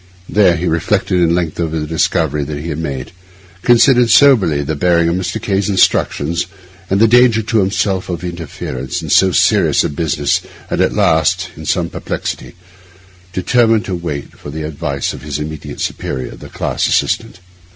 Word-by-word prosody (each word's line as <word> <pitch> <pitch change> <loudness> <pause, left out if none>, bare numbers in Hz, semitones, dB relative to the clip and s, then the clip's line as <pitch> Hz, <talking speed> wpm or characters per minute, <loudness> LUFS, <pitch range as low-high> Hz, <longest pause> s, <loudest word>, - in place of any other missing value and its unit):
There 95 -4 +3
he 85 +2 -2
reflected 90 +2 0
at 85 - +3
length 85 -1 -1
over 80 -1 -1
the 75 - -3
discovery 75 -1 0
that 75 0 -5
he 75 +4 -6
had 75 0 -4
made; 70 -6 -5 0.5
considered 120 +1 +4
soberly 105 - +5
the 80 - -2
bearing 85 +2 +2
of 85 - 0
Mr. 95 +4 -3
K—'s 100 -2 -1
instructions 85 -4 +1 0.4
and 95 - +1
the 115 - +6
danger 120 -1 +4
to 115 0 +1
himself 95 -1 0
of 85 -2 -4
interference 85 -3 -5
in 75 - -4
so 95 -1 +5
serious - - +3
a - - -1
business, 75 -1 0 0.3
and - - 0
at - - +2
last, 85 +3 +1
in 80 -1 -9
sore - - +1
perplexity, - - -5 0.8
determined 115 +4 +2
to 95 - -4
wait 85 -5 -5
for - - -10
the 80 +2 -5
advice 70 -2 -3
of - - -9
his 75 -2 -4
immediate 75 0 -7
superior, 65 -1 -4
the - - -12
class - - -2
assistant. - - 0
85 Hz, 170 wpm, -16 LUFS, 75-100 Hz, 0.8 s, the